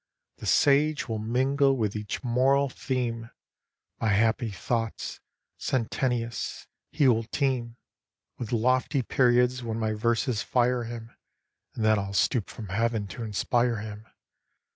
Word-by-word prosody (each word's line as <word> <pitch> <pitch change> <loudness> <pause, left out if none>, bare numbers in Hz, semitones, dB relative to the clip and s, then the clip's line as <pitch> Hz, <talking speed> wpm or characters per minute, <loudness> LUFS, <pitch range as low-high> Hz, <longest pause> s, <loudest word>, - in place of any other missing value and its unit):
The - - -7
sage 145 +1 +3
will 110 -2 -2
mingle 135 +5 +2
with 105 -3 -1
each 105 +3 -4
moral 135 +3 +3
theme 120 -3 -3 0.7
My 115 - 0
happy 110 +3 +2
thoughts 115 +3 -3 0.4
sententious; 120 -1 -2 0.3
he 145 -2 +3
will 115 -2 +3
teem 120 -2 -1 0.6
With 120 - -5
lofty 130 +3 +2
periods 125 0 +3
\\hen 115 -2 -3
my 110 -1 0
verses 115 +1 0
fire 125 -1 +1
him. 115 0 -7 0.6
And 110 - -1
then 110 -1 +4
I'll 100 0 -4
stoop 110 +2 +1
from 105 -4 -8
heaven 115 +1 0
to 125 - -7
inspire 115 +3 +1
him. 105 +1 -8
120 Hz, 130 wpm, -27 LUFS, 110-130 Hz, 0.7 s, then